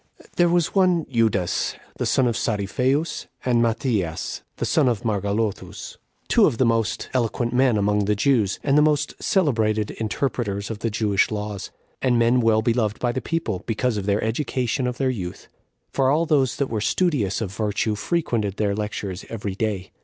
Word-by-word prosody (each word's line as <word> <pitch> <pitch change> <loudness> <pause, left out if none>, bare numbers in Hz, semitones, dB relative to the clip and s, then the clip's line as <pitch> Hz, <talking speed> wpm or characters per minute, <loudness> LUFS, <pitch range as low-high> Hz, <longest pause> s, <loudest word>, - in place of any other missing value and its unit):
2. - - -18
There 175 -1 +4
was 175 -1 +1
one 180 -4 +3
Judas, 110 -7 +1 0.2
the - - -1
son 130 - +3
of 120 -2 +1
Saripheus, 125 +10 -1 0.2
and 120 -2 +3
Matthias, 110 - -1 0.2
the - - -1
son 150 -5 +3
of 120 -2 0
Margalothus, 105 0 -2 0.3
two - - +5
of 115 - -1
the 130 - +3
most 115 -2 0
eloquent 120 -1 0
men 125 -3 +3
among 105 0 +1
the 105 +1 +1
Jews, 105 -3 +2
and 140 -1 +2
the 150 - +6
most 150 -1 +2
celebrated 110 - +1
interpreters 110 -3 -2
of 110 - -5
the 115 - -1
Jewish 105 -2 +1
laws, 105 -2 -4 0.3
and 125 -2 +2
men 120 +2 +3
well 110 -1 +3
beloved 115 -2 +1
by 120 - 0
the 130 - -3
people, 140 - -2
because 115 +1 0
of 100 -1 -3
their 100 +1 +1
education 125 +1 -1
of 125 -1 -3
their 130 -1 +1
youth; 90 -7 -6 0.4
for 135 -1 +2
all 155 +4 +2
those 140 -5 +2
that 140 - 0
were 110 -2 -1
studious 115 - +1
of 100 -4 -4
virtue 105 0 -1
frequented 110 - -1
their 105 -2 +1
lectures 105 -2 -4
every 105 -3 -4
day. 100 -2 -3
115 Hz, 180 wpm, -23 LUFS, 105-130 Hz, 0.4 s, the